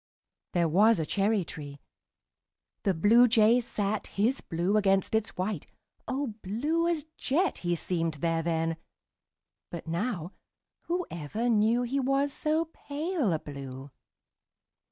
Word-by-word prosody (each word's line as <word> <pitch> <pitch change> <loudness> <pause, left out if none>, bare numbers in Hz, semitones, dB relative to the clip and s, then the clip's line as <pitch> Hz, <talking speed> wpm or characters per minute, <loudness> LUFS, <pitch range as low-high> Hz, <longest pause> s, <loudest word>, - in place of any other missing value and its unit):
There 170 -2 +3
was 210 +7 +5
a 160 - -1
cherry 200 +2 +1
tree. 145 -3 -8 1.1
The 195 -3 +2
Bluejay 225 +4 +5
sat 210 -2 -2
His 230 +7 0
blue 175 +5 -1
against 195 -1 +2
its 220 -3 0
white 185 -3 -2 0.4
O 265 -3 -2
blue 295 - 0
as 335 -3 0
jet 340 +8 0
He 175 -1 0
seemed 165 -2 -1
there 165 +2 0
then! 165 0 -1 0.9
But 170 - -7
now 170 +1 -2 0.6
Whoever 235 - -2
knew 225 +2 +3
He 260 +3 -1
was 275 +1 +1
so 315 +2 0
pale 295 - -2
a 160 - +2
blue! 135 -2 -8
210 Hz, 125 wpm, -29 LUFS, 165-250 Hz, 1.1 s, was